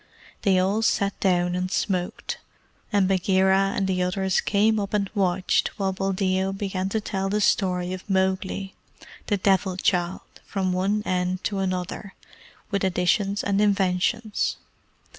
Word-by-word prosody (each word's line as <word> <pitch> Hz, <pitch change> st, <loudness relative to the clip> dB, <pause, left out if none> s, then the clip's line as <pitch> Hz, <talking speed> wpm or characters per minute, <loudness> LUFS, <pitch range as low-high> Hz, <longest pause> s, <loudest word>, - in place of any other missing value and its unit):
They 195 Hz, -3 st, +3 dB
all 195 Hz, +4 st, +2 dB
sat 200 Hz, -2 st, +1 dB
down 180 Hz, -2 st, +2 dB
and 180 Hz, +1 st, -1 dB
smoked, 180 Hz, -4 st, -2 dB, 0.5 s
and 200 Hz, -3 st, +3 dB
Bagheera 190 Hz, +1 st, +3 dB
and 195 Hz, -, 0 dB
the 185 Hz, -1 st, 0 dB
others 190 Hz, +1 st, +1 dB
came 215 Hz, +1 st, +2 dB
up 200 Hz, +1 st, -2 dB
and 200 Hz, -1 st, +1 dB
watched 190 Hz, -3 st, +1 dB
while 195 Hz, -2 st, 0 dB
Buldeo 190 Hz, 0 st, 0 dB
began 195 Hz, -1 st, -2 dB
to 220 Hz, -, 0 dB
tell 195 Hz, -2 st, -2 dB
the 210 Hz, +2 st, 0 dB
story 180 Hz, -3 st, +1 dB
of 185 Hz, +3 st, -8 dB
Mowgli, 190 Hz, 0 st, 0 dB, 0.5 s
the 205 Hz, -, +1 dB
Devil 190 Hz, -1 st, +1 dB
child, 180 Hz, -1 st, 0 dB, 0.2 s
from 190 Hz, -2 st, -1 dB
one 200 Hz, +3 st, 0 dB
end 180 Hz, 0 st, -1 dB
to 200 Hz, -3 st, -1 dB
another, 185 Hz, +1 st, -3 dB, 0.6 s
with 200 Hz, -1 st, 0 dB
additions 190 Hz, +2 st, +1 dB
and 200 Hz, 0 st, +1 dB
inventions. 205 Hz, +2 st, +1 dB
190 Hz, 140 wpm, -25 LUFS, 185-200 Hz, 0.6 s, They